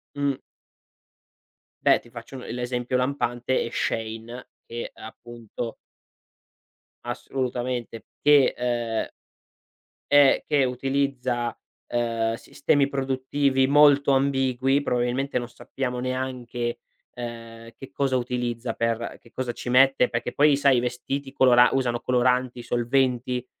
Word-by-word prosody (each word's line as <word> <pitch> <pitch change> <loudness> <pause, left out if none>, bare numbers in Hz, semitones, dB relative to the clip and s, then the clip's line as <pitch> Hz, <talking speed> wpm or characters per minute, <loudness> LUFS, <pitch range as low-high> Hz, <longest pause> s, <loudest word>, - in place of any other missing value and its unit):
Mh. 140 -1 0 1.5
Beh, - - +6
ti 120 - -19
faccio 120 +3 -10
un 125 - -9
l'esempio 125 +1 -3
lampante 125 -1 0
è - - -5
Shein 115 +2 -3 0.2
che, 120 0 -6
appunto 115 0 -8 1.3
Assolutamente. 120 -1 -4 0.2
Che, 145 -2 +5
ehm 120 -2 -1 1.0
Eh, 145 -2 +6
che 145 -2 +3
utilizza, 125 -2 -1 0.3
ehm, 115 -1 -1
sistemi 140 +4 +1
produttivi 135 0 0
molto 145 0 +5
ambigui. 135 0 +2
Probabilmente 125 +1 -1
non 120 - -5
sappiamo 125 0 -5
neanche, 125 -2 -3 0.3
ehm, 115 -1 -8
che 135 - -11
cosa 135 -2 0
utilizza 120 -1 -3
per 115 0 -2
che 115 - -21
cosa 130 -2 -3
ci 120 - -6
mette, 130 0 +5
perché 115 - -3
poi 145 0 +5
sai 140 -2 +4
i - - +4
vestiti 130 +3 -3
colora 125 -2 +5
usano 120 -3 0
coloranti, 125 0 +1
solventi, 125 +1 0
125 Hz, 110 wpm, -25 LUFS, 120-135 Hz, 1.5 s, Beh